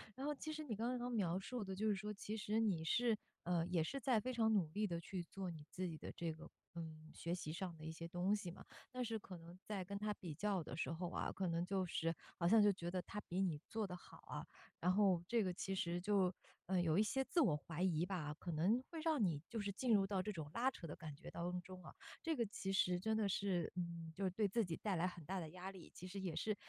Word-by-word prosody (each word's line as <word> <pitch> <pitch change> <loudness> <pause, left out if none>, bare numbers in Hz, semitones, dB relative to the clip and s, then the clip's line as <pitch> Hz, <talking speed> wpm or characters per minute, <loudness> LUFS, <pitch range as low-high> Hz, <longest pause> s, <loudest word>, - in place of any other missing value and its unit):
然 270 - -4
后 295 - +2
其 310 +2 -4
实 310 0 -3
你 245 -7 -3
刚 240 +4 0
刚 245 +1 -2
描 185 -6 +2
述 225 +3 -3
的 190 0 -3
就 215 +3 +1
是 205 - +4
说， 210 +2 -3
其 210 +2 -4
实 215 +1 +1
你 175 -7 +2
是， 230 +4 +4 0.3
呃， 170 -1 +2
也 175 -3 +3
是 275 +11 -2
在 235 -3 +3
非 255 - -1
常 220 -2 +4
努 180 -7 +4
力 210 +5 +1
地 170 -1 -2
去 185 0 -3
做 185 0 -4
你 155 -3 -8
自 185 0 -2
己 160 -2 -4
的 - - -6
这 170 -1 -1
个， 160 +1 -9 0.3
嗯， 155 -1 -6
学 170 +1 -1
习 155 -3 -4
上 175 0 -3
的 155 - -11
一 160 - -3
些 165 +1 -5
东 180 +3 +2
西 200 -4 0
嘛， - - -11 0.3
但 250 0 -1
是 225 -2 -1
可 190 -2 -8
能 170 +2 -11
在 200 -3 -2
跟 200 +2 -4
他 210 0 0
比 170 -6 -6
较 195 0 +1
的 150 - -6
时 - - 0
候 170 +1 -2
啊， - - -1
可 190 -2 0
能 170 +1 +1
就 190 -1 +1
是 165 -1 0 0.2
好 170 - +4
像 215 +2 +8
就 205 - +7
觉 175 -2 -3
得 180 0 0
他 210 +3 -5
比 185 +2 +1
你 165 -6 +2
做 220 -1 0
得 180 -2 -4
好 - - -14
啊， - - -4 0.3
然 180 +2 +4
后 190 -4 +5
这 230 -2 +3
个 185 - 0
其 195 +2 -2
实 175 -1 0
就， 190 -1 +3 0.3
呃， 185 -1 +3
有 165 0 +3
一 - - +7
些 265 +5 +1
自 340 - +3
我 165 - +5
怀 160 +3 -5
疑 175 -2 +3
吧， 165 -6 -2
可 175 - -3
能 190 +11 +4
会 325 - -4
让 315 -6 +3
你 155 -6 +2
就 230 - -2
是 200 -1 0
进 235 +3 +2
入 195 -1 +5
到 195 -2 +1
这 210 - -2
种 155 -5 -5
拉 245 +5 +4
扯 175 - -8
的 150 - -5
感 155 -3 -6
觉 - - -9
当 180 +1 -1
中 185 0 -9
啊， - - -9 0.3
这 325 -2 +1
个 235 -3 +2
其 195 -1 -3
实 180 -2 +4
真 220 +3 +1
的 215 -2 +3
是， 190 -3 +1
嗯， 170 -2 -3
就 200 - -2
是 - - +4
对 205 +3 +2
自 230 +4 +2
己 165 -2 -2
带 200 -4 0
来 175 +2 +3
很 175 -3 -6
大 190 +1 -1
的 160 -2 -4
压 185 +1 -5
力。 185 -3 -11
其 180 - -7
实 195 +2 -5
也 180 -4 -2
是， 215 -1 +1
185 Hz, 300 characters per minute, -41 LUFS, 170-210 Hz, 0.3 s, 像